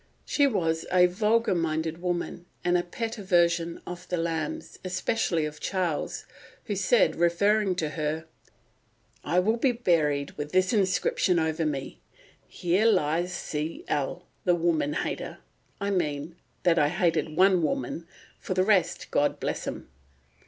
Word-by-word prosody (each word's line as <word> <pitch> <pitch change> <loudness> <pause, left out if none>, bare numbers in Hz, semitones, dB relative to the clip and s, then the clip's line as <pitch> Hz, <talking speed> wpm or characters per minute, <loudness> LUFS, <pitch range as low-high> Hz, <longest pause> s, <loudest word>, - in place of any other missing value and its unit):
She 285 -1 +3
was 165 -9 0
a 180 -1 +6
vulgar 215 +5 +2
minded 160 -1 -1
woman, 175 0 -3 0.2
and 175 0 +2
a 175 - +4
pet 225 +6 -5
aversion 170 -3 +2
of 180 0 -8
the 180 - 0
Lambs, 170 - -3
especially 185 -3 0
of 150 0 -6
Charles, 180 -5 -2 0.4
who 205 - -3
said, 200 +4 +3
referring 190 +4 +2
to 160 -4 -1
her, 155 +1 -3 1.0
"I 175 - 0
will 215 +6 +3
be 255 +2 +3
buried 155 - +1
with 150 +2 -5
this 185 +4 +3
inscription 185 -2 +2
over 160 0 0
me, 140 -3 -4 0.5
'Here 185 +6 +1
lies 175 -3 +2
C. 155 -2 -4
L., 140 -2 -2 0.2
the 180 -2 +3
woman 165 -3 +1
hater'—I 200 +5 -5
mean, 155 -3 -2 0.3
that 170 -2 +4
hated 155 +1 +1
one 185 -1 +5
woman; 155 +2 -2 0.3
for 185 - -4
the 185 - +3
rest, 185 -4 +1
God 145 - +1
bless - - -3
'em." - - -5
175 Hz, 140 wpm, -27 LUFS, 160-190 Hz, 1.0 s, a